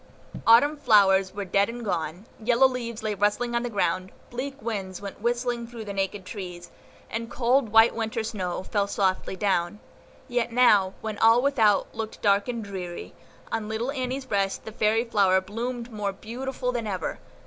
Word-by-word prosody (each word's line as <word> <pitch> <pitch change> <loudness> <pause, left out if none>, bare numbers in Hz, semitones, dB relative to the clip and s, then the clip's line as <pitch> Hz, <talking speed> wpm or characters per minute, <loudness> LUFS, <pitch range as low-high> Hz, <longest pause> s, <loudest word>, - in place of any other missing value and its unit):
Autumn 285 +7 +6
flowers 195 -7 +4
were 200 0 -5
dead 200 +3 +2
and 235 0 -6
gone, 175 0 -3 0.2
yellow 245 +3 +5
leaves 235 -3 -5
lay 215 -1 0
rustling 210 +4 0
on 235 - +1
the 245 - -3
ground, 185 -3 -1 0.2
bleak 270 +3 -5
winds 200 -5 -4
went 200 0 -8
whistling 240 0 -1
through 230 -2 -8
the 200 - -5
naked 195 0 -2
trees, 180 -4 -8 0.4
and 230 +1 -3
cold, 250 0 +2
white 225 +2 +6
Winter 225 0 -2
snow 185 -5 -3
fell 200 +1 0
softly 190 -1 0
down; 190 0 0 0.5
yet 245 -2 -1
now, 210 -6 +4
when 215 -2 -5
all 225 +1 +6
without 225 -8 +3
looked 220 -1 -5
dark 200 0 +3
and 235 -2 -3
dreary, 185 -4 -6 0.4
on 215 -1 -2
little 225 +4 -2
Annie's 260 0 -3
breast 195 -5 -1
the 220 - -6
fairy 215 +1 +2
flower 195 -5 +3
bloomed 235 +5 -5
more 205 -2 -2
beautiful 250 +5 -4
than 235 -3 -3
ever. 185 -5 -3
220 Hz, 170 wpm, -26 LUFS, 195-240 Hz, 0.5 s, Autumn